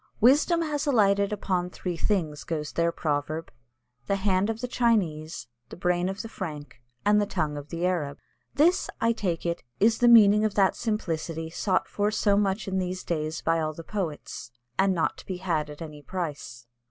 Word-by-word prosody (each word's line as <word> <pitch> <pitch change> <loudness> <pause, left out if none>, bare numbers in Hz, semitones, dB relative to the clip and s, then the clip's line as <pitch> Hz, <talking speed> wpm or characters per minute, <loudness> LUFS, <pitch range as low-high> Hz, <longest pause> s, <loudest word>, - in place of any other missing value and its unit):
"Wisdom 295 +8 +4
has 300 -2 -2
alighted 200 -6 +3
upon 185 -3 -1
three 180 -1 -4
things," 165 -6 -1
goes 150 -3 -3
their 170 0 +1
proverb; 155 +1 -2 0.6
"the 200 - +2
hand 195 0 +1
of 225 0 -2
the 250 - -3
Chinese, 180 - 0 0.2
the - - -8
brain 180 +1 +1
of 195 +3 -4
the - - -6
Frank, 150 - -7 0.2
and 210 0 +5
the 205 - 0
tongue 150 -5 -1
of 145 0 -7
the 170 +1 -2
Arab." 155 -6 -1 0.4
This, 325 +6 +3
I 230 - +3
take 185 -8 -2
it, 170 0 -1 0.2
is 225 +2 +4
the 245 - +5
meaning 210 -3 +7
of 215 -2 0
that 195 -2 +3
simplicity 165 -7 -3
sought 185 +2 0
for 205 0 0
so 210 -1 +2
much 200 0 0
in 190 0 0
these 185 0 -3
days 155 -1 -3
by 165 0 +2
all 155 -1 -1
the 165 - -9
poets, 165 - -5 0.3
and 195 +3 +2
not 165 - 0
to - - -12
be 185 - -3
had 165 -5 -1
at 150 +2 -8
any 150 -2 -9
price. 145 -9 -5
185 Hz, 190 wpm, -27 LUFS, 160-210 Hz, 0.6 s, meaning